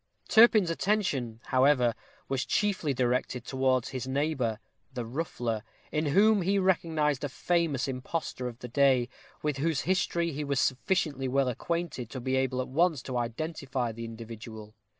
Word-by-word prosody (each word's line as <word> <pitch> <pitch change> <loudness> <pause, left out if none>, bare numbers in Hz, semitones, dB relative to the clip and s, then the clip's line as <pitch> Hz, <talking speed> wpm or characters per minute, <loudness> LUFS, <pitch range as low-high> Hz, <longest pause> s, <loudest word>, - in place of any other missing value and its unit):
Turpin's 220 -6 +6
attention, 165 - -1
however, 130 -2 +3 0.3
was 135 -1 -1
chiefly 195 -8 0
directed 125 -1 0
towards 130 -2 +1
his 130 -1 -5
neighbor, 135 -5 0 0.3
the 125 -3 -4
ruffler, 120 -4 -3 0.3
in 155 0 0
whom 205 +7 +4
he 195 +3 +1
recognized 160 -7 +1
a 145 - -1
famous 160 -2 0
impostor 130 0 -3
of 120 -2 -7
the 125 - -8
day, 130 -1 +3 0.3
with 150 -2 0
whose 155 0 0
history 170 -2 0
he 150 +1 -4
was 140 -2 0
sufficiently 135 0 0
well 135 +1 +2
acquainted 160 -2 -3
to 130 - -6
be 130 +1 -1
able 130 -1 +1
at - - -9
once 160 0 +1
to 130 - -5
identify 130 0 -3
the 115 +1 -7
individual. 110 -1 -9
135 Hz, 150 wpm, -29 LUFS, 125-165 Hz, 0.3 s, Turpin's